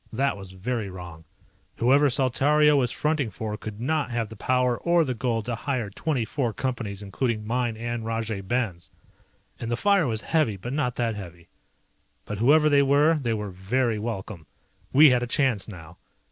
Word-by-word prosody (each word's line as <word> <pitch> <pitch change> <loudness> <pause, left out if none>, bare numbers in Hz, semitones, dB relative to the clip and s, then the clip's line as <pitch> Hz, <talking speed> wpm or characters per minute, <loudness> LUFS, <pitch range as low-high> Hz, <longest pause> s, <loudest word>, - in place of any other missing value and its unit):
That 135 +3 0
was 95 -2 -10
very 110 +2 -3
wrong. 85 -3 -10 0.5
Whoever 140 +4 +4
Saltario 145 +4 +3
was 125 -4 +2
fronting 150 -5 0
for 105 +2 -5
could 105 0 -8
not 150 +3 0
have 115 -3 -2
the 110 - -10
power 125 +2 +1
or 170 -1 +3
the 130 - -1
gold 115 -2 -2
to 120 - -2
hire 120 -3 -3
twenty 135 0 -1
four 120 -2 -2
Companies 110 -6 -4
including 110 +2 -2
mine 120 0 -1
and 120 0 -4
Rajay 115 -2 -3
Ben's. 100 -4 -2 0.7
And 115 - -4
the 120 - -1
fire 200 -4 +3
was 110 -2 -1
heavy 150 -11 +1
but 120 +7 -6
not 130 -5 -1
that 115 -2 0
heavy. 85 -4 -10 0.8
But 105 -1 -5
whoever 150 +6 +5
they 145 -1 +5
were 145 +3 +4
they 115 -3 0
were 105 -2 -4
very 110 +5 -1
welcome. 100 - -5 0.4
We 145 +1 +7
had 125 -1 +2
a 120 - -2
chance 125 - +1
now. 80 -5 -11
120 Hz, 180 wpm, -25 LUFS, 105-135 Hz, 0.8 s, We